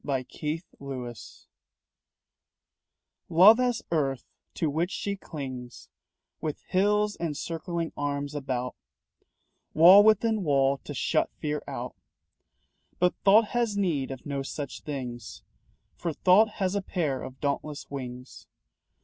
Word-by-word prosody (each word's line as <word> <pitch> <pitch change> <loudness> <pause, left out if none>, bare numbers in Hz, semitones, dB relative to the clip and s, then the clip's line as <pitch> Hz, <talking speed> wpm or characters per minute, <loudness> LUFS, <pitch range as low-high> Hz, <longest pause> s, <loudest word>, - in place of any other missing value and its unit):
BOND 135 -3 -2 0.2
AND 155 +3 -2 0.2
FREE 130 -3 -6 2.2
Love 195 +8 +8
has 245 -2 0
earth 135 -6 0 0.3
to 160 - 0
which 160 +4 0
she 200 0 -3
clings 130 -9 -8 0.5
With 155 -2 -4
hills 210 +2 +2
and 160 -4 -3
circling 170 0 -4
arms 145 0 -3
about 130 -3 -3 1.0
Wall 180 +6 +9
within 220 0 +3
wall 140 -3 +2
to - - -6
shut - - +1
fear 150 -1 -2
out. - - -5 1.0
But 180 0 +3
Thought 210 +2 +6
has 235 -4 0
need 165 -9 0
of 135 -2 -8
no 140 -1 -3
such 140 0 -6
things, 125 -6 -6 0.5
For 170 -2 -3
Thought 195 +7 +5
has 190 -1 -1
a 200 - 0
pair 155 -8 -2
of 130 0 -9
dauntless 145 +1 -3
wings. 125 -2 -8
150 Hz, 125 wpm, -27 LUFS, 135-190 Hz, 2.2 s, Wall